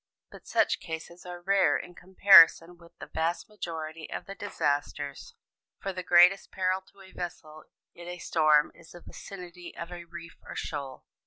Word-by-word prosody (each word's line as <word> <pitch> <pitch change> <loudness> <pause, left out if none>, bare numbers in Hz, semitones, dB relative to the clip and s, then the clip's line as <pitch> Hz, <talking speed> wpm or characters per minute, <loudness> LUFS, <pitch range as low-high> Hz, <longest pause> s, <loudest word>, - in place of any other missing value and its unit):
But - - -14
such - - +2
cases 165 +2 -8
are 175 0 -8
rare 190 -6 +3
in 175 - -9
comparison 175 -2 +6
with 170 -1 -19
the - - -9
vast 165 +5 -2
majority 165 -6 -7
of - - -6
the 195 - -7
disasters; 145 -7 -3 0.4
for 195 - -4
the 185 - -5
greatest 180 +2 +5
peril 185 0 0
to 200 - -19
a 190 - -15
vessel 155 -3 -8 0.3
in 175 0 -12
a 180 0 -6
storm 155 -3 +3
is 170 -1 -17
the 175 - -12
vicinity 180 -2 -10
of 170 +1 -7
a 175 -1 -8
reef 170 0 -11
or - - -9
shoal. 140 -3 -6
175 Hz, 170 wpm, -28 LUFS, 160-185 Hz, 0.4 s, comparison